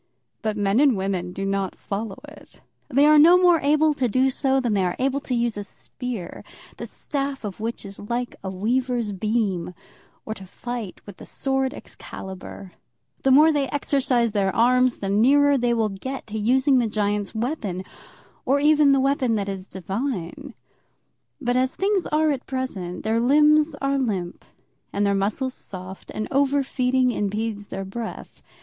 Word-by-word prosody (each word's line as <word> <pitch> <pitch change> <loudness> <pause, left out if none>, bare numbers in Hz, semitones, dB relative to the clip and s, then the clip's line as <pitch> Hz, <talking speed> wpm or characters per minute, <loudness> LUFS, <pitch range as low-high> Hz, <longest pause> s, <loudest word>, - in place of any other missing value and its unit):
But 215 -1 -2
men 205 +2 +2
and 275 -6 +4
women 190 -2 -2
do 195 +2 -4
not 195 -1 -1
follow 200 0 -5
it. - - -15 0.3
They 280 +1 +4
are 305 0 +7
no 340 +4 +8
more 355 -2 +5
able 305 +2 +3
to 265 -3 0
do 260 +4 +2
so 270 0 +1
than 240 -4 0
they 195 -2 +2
are 180 -1 -1
to 270 0 -1
use 235 -2 0
a 205 - -4
spear, 230 -2 -7 0.3
the - - -6
staff 275 -2 -4
of 205 -2 -6
which 225 0 -4
is 195 0 -9
like 245 +1 -2
a 190 - -3
weaver's 235 +3 -1
beam, 195 -3 -1 0.5
or 220 - -3
to 190 -3 -12
fight 235 -1 -6
with 200 -2 -11
the - - -11
sword 270 -1 -1
Excalibur. 190 0 -9 0.5
The 270 - +2
more 300 +5 +7
they 285 -3 0
exercise 255 -5 +1
their 200 -2 +1
arms, 250 +2 +3
the 195 - -2
nearer 275 +8 +4
will 235 -4 +1
they 195 - -8
get 265 +5 -5
to 220 0 -5
using 260 +5 +3
the 235 - +1
giant's 205 -1 -1
weapon, 220 - -3 0.6
or 275 +2 +2
even 295 -1 +5
the 275 - +3
weapon 270 -3 +1
that 200 -2 -2
is 195 -1 -5
divine. 190 -1 -5 0.8
But 245 -3 -1
as 255 +1 +1
things 390 -1 0
are 310 0 +2
at 275 -2 -4
present, 200 -10 -4
their 220 +1 +1
limbs 300 +4 +4
are 275 0 +1
limp 195 -9 -3 0.5
and 205 +1 0
their 200 - +2
muscles 215 +7 -1
soft, 185 -3 -9
and 215 - -4
over 280 +1 +2
feeding 255 -1 +1
impedes 210 -1 -3
their 195 0 -5
breath. 220 +4 -7
240 Hz, 170 wpm, -23 LUFS, 200-270 Hz, 0.8 s, no